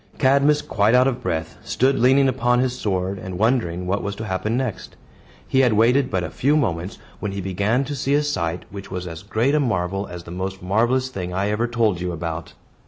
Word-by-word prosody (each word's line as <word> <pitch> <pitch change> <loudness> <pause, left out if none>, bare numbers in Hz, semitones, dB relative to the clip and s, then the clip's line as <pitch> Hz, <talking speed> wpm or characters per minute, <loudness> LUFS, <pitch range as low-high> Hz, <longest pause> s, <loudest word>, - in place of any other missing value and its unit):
Cadmus, 140 +2 +3
quite 110 -5 +2
out 125 +1 +5
of 125 -2 -1
breath, 80 0 -3
stood 135 +2 +1
leaning 135 +3 +5
upon 125 -1 +2
his 125 0 +1
sword, 95 -4 -2
and 95 -1 -6
wondering 100 -6 +1
what 100 +3 0
was 100 0 -4
to 110 - -6
happen 105 +4 -1
next. 125 -8 -4 0.5
He 130 - +2
had 125 -4 +4
waited 125 +5 +3
but 95 -7 -1
a 80 - -4
few 145 +4 +2
moments, 95 - -1 0.2
when 105 -2 -3
he 100 - -4
began 100 +7 0
to 145 +1 -4
see 140 +1 0
a 150 - +2
sight, 85 - -2
which 100 0 -8
was 90 -1 -4
as 85 -1 -7
great 110 +7 0
a 150 - +3
marvel 100 -6 -1
as 90 -1 -8
the 85 - -10
most 95 +1 -5
marvelous 120 +7 +1
thing 90 -6 -5
I 100 +2 0
ever 115 +3 0
told 115 -7 +1
you 90 -1 -2
about. 85 -1 -5
105 Hz, 220 wpm, -22 LUFS, 90-130 Hz, 0.5 s, out